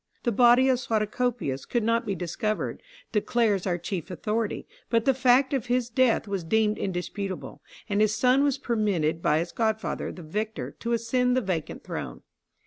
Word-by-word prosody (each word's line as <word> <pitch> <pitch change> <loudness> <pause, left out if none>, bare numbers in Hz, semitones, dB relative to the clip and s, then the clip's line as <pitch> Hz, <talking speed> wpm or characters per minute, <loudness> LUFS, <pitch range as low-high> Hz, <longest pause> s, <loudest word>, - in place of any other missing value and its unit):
The 240 - +1
body 245 +3 +5
of 255 -2 +3
Suatocopius 220 - -1
could 240 -2 +1
not 230 +1 +1
be 200 - -1
discovered, 185 +5 -3 0.3
declares 210 -3 +1
our 175 -1 +1
chief 175 0 -5
authority, 210 +4 -2 0.2
but 230 -1 +2
the 270 - +4
fact 260 +2 +3
of 260 -5 -1
his 245 -1 0
death 245 -3 +2
was 195 -3 -2
deemed 215 +5 +1
indisputable, 185 +1 -4 0.3
and 205 -1 +1
his 215 0 +3
son 255 +4 +4
was 285 -2 +2
permitted 195 -9 0
by 150 - +3
his 170 +2 -2
godfather, 220 -1 -1
the 175 - -10
victor, 215 +7 -4
to 235 0 -2
ascend 250 +2 +1
the - - +2
vacant 185 -7 -3
throne. - - -6
220 Hz, 170 wpm, -26 LUFS, 195-245 Hz, 0.3 s, body